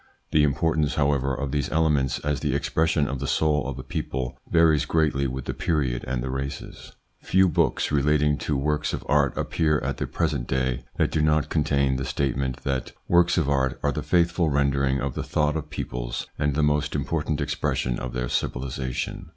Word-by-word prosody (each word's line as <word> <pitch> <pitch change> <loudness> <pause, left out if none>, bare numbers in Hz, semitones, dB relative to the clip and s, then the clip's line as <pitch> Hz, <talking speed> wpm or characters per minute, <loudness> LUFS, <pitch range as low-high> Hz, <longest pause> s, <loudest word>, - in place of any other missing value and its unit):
The 75 - +4
importance, 75 +1 +1
however, 70 -2 +1
of 70 0 -3
these 70 -2 -1
elements 75 -5 +2
as 75 -2 0
the - - -1
expression 80 -2 +1
of 70 -1 -3
the 70 - -3
soul 75 0 +1
of 70 -2 -5
a 65 - -6
people 65 -1 -4
varies 80 -3 +4
greatly 75 -4 +1
with 65 0 -5
the - - -2
period 70 -7 -1
and 65 -2 -2
the 65 - -3
races. 70 +2 -6 0.3
Few 95 0 +3
books 80 - +1
relating 75 0 +2
to 75 - -1
works 75 +2 0
of - - -4
art 70 -1 +3
appear 75 -2 +1
at - - -2
the - - -2
present 75 -7 -1
day 65 -1 -1
that - - +2
do 75 - +1
not 75 0 +2
contain 70 -4 +1
the 65 - -3
statement 65 -1 -2
that 65 -2 -2
works 85 +1 +4
of 80 -5 +2
art 65 -2 +1
are - - +2
the - - -3
faithful 85 -1 +2
rendering 70 -1 +1
of 70 0 -2
the - - -3
thought 75 0 0
of 75 -1 -4
peoples - - -4
and 75 -1 0
the 75 - +2
most 75 0 +1
important 75 +1 -1
expression 65 -4 -1
of 65 -1 -5
their 60 0 -2
civilisation. 65 0 -3
70 Hz, 190 wpm, -25 LUFS, 65-75 Hz, 0.3 s, The